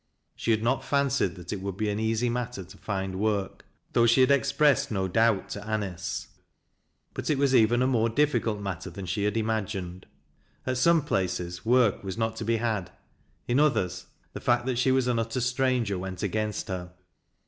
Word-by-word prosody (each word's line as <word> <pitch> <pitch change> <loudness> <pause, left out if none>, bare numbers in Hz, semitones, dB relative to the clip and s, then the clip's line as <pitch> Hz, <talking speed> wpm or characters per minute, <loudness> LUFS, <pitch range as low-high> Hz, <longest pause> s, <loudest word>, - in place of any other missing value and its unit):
She - - -4
had 110 -1 +2
not 130 +3 +1
fancied 140 -9 +1
that 90 0 -7
it 100 - -5
would 100 -1 -4
be 110 - -1
an 100 - -2
easy 110 +2 +1
matter 120 -3 -3
to 90 - -14
find 95 -2 -3
work, 100 -2 -1 0.3
though 120 0 +4
she 120 +3 +5
had 130 +2 +5
expressed 140 +1 +3
no 95 -3 -1
doubt 110 +1 +2
to 100 - -5
A 110 - +2
nice, 95 -5 -4 0.9
but - - -4
it 150 - +2
was 140 -1 +2
even 120 0 +4
a - - +3
more 115 -3 +2
difficult 120 -5 +1
matter 95 -2 -5
than 95 +2 -7
she 95 +3 -1
had 105 +2 0
imagined. 100 -5 -3 0.6
At 130 -1 -1
some 165 +2 +4
places 90 -6 -2
work 120 -5 +3
was 95 0 -5
not 110 -1 -1
to - - -4
be 115 +1 +1
had, 110 -5 -1 0.6
in 125 +3 +2
others 95 -12 +1 0.3
the - - -7
fact 120 0 +2
that 130 -2 -1
she 130 +1 +3
was 130 -1 +2
an 125 -2 +1
utter 115 +2 -2
stranger 125 -5 0
went 95 +1 -5
against 105 +2 -2
her. 90 -2 -5
110 Hz, 195 wpm, -27 LUFS, 95-125 Hz, 0.9 s, she